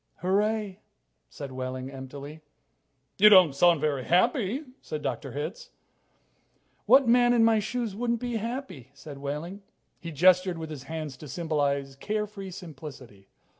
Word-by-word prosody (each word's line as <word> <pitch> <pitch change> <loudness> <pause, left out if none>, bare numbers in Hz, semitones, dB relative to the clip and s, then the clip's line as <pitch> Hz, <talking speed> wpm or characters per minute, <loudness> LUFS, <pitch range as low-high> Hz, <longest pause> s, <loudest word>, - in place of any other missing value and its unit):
"Hooray," 205 +1 0 0.5
said 135 - -8
Wehling 130 0 -5
emptily. 140 +3 -9 0.8
"You 210 +2 +9
don't 185 -8 +7
sound 170 +2 +4
very 145 -4 0
happy," 230 - +1 0.2
said 155 -1 -6
Dr. 135 -5 -4
Hitz. 150 +8 -5 1.2
"What 270 -2 +6
man 245 +1 +5
in 230 -2 +5
my 225 -1 +4
shoes 220 0 -3
wouldn't 235 +1 -1
be 240 -1 -2
happy?" 230 - -6
said 140 0 -10
Wehling. 150 +8 -5 0.4
He 170 - -7
gestured 180 +3 +4
with 160 -1 -6
his 140 -4 -8
hands 155 -5 -5
to 150 - -10
symbolize 140 -3 -1
care 210 +8 -2
free 200 -2 -9
simplicity. 140 - -11
170 Hz, 140 wpm, -27 LUFS, 140-210 Hz, 1.2 s, You